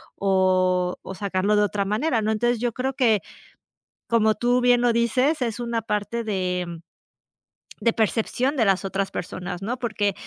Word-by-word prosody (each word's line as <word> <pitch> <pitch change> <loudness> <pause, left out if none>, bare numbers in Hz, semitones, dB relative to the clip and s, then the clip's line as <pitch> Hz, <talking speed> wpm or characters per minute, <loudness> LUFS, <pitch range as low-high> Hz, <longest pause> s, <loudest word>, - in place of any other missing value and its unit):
o 185 -2 +2
o 190 - -8
sacarlo 200 +1 0
de 210 - +4
otra 200 -1 -1
manera, 225 +4 0
¿no?, 215 - -1
entonces 240 +1 +1
yo 240 -1 0
creo 265 +1 -2
que, 225 -6 +2 0.9
como 220 -2 +3
tú 245 +3 +1
bien 245 -1 +4
lo 240 -1 +3
dices, 255 +6 +1
es 235 0 -3
una 235 -2 -2
parte 215 +2 -2
de 180 -4 -2 1.0
de 230 - +2
percepción 245 +5 0
de 225 - +3
las 195 0 +2
otras 195 0 -2
personas, 180 +1 -6
¿no?, 240 +5 -3
porque, 210 -4 -1
215 Hz, 165 wpm, -24 LUFS, 195-240 Hz, 1.0 s, de